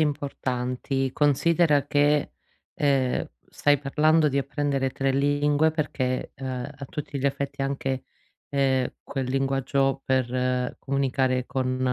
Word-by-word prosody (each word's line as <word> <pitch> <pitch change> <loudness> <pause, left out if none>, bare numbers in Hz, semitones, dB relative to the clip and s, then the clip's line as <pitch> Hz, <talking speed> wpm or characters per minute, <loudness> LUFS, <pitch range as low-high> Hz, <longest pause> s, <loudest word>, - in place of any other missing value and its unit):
importanti. 135 -3 -1
Considera 150 0 +3
che, 145 0 +2 0.4
ehm, 135 -3 +1 0.2
stai 145 -1 +2
parlando 155 +2 +3
di 140 - 0
apprendere 140 -1 0
3 135 +1 -1
lingue 145 +2 +2
perché, 130 -5 -2
uhm, 135 - -6 0.3
a 140 - -6
tutti 145 +1 -5
gli 135 - 0
effetti, 140 0 -3
anche, 135 -1 -2 0.4
ehm, 135 -2 +1
quel 135 -2 -4
linguaggio 135 0 +1
per 125 -1 0
comunicare 130 -2 0
con, 130 -1 -2
135 Hz, 115 wpm, -25 LUFS, 130-145 Hz, 0.4 s, Considera